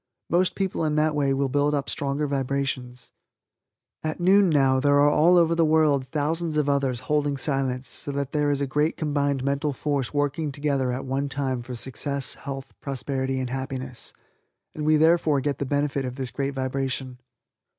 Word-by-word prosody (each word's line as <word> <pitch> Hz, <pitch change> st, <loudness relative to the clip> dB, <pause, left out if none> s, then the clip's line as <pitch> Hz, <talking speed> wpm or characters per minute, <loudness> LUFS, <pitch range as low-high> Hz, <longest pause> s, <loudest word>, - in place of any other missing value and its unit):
Most 180 Hz, +2 st, +2 dB
people 190 Hz, -4 st, -1 dB
in 155 Hz, -1 st, 0 dB
that 155 Hz, 0 st, +2 dB
way 145 Hz, -2 st, +1 dB
will 135 Hz, 0 st, +1 dB
build 145 Hz, +2 st, +1 dB
up 140 Hz, -1 st, -2 dB
stronger 140 Hz, +1 st, -1 dB
vibrations. 135 Hz, -2 st, -3 dB, 0.9 s
At 155 Hz, +2 st, -3 dB
noon 190 Hz, +2 st, +5 dB
now 135 Hz, -4 st, +3 dB
there 145 Hz, +1 st, +3 dB
are 145 Hz, +1 st, +5 dB
all 170 Hz, +5 st, +5 dB
over 170 Hz, -1 st, +4 dB
the 165 Hz, 0 st, +3 dB
world 155 Hz, -4 st, +3 dB
thousands 160 Hz, +2 st, -1 dB
of 150 Hz, -1 st, +1 dB
others 135 Hz, -4 st, 0 dB
holding 145 Hz, +1 st, 0 dB
Silence 135 Hz, -2 st, -1 dB
so 145 Hz, -, -4 dB
that 140 Hz, -1 st, -2 dB
there 150 Hz, -1 st, +1 dB
is 145 Hz, -1 st, 0 dB
a -, -, +1 dB
great 150 Hz, +4 st, 0 dB
combined 145 Hz, -3 st, 0 dB
mental 140 Hz, +2 st, 0 dB
force 140 Hz, -1 st, -2 dB
working 145 Hz, +1 st, -1 dB
together 140 Hz, -3 st, 0 dB
at 130 Hz, +2 st, -4 dB
one 135 Hz, +2 st, -1 dB
time 135 Hz, -3 st, -2 dB
for 125 Hz, +1 st, -7 dB
success, 135 Hz, +2 st, -3 dB
health, 135 Hz, -1 st, -7 dB
prosperity 135 Hz, -1 st, -2 dB
and 130 Hz, -1 st, -3 dB
happiness, 130 Hz, -1 st, -5 dB, 0.6 s
and 150 Hz, -, -4 dB
we 155 Hz, 0 st, +5 dB
therefore 160 Hz, -2 st, +4 dB
get 140 Hz, 0 st, -2 dB
the 140 Hz, -, -2 dB
benefit 145 Hz, 0 st, 0 dB
of 125 Hz, -1 st, -4 dB
this 130 Hz, -3 st, -4 dB
great 140 Hz, +2 st, -3 dB
vibration. 130 Hz, -1 st, -3 dB
140 Hz, 180 wpm, -25 LUFS, 135-150 Hz, 0.9 s, noon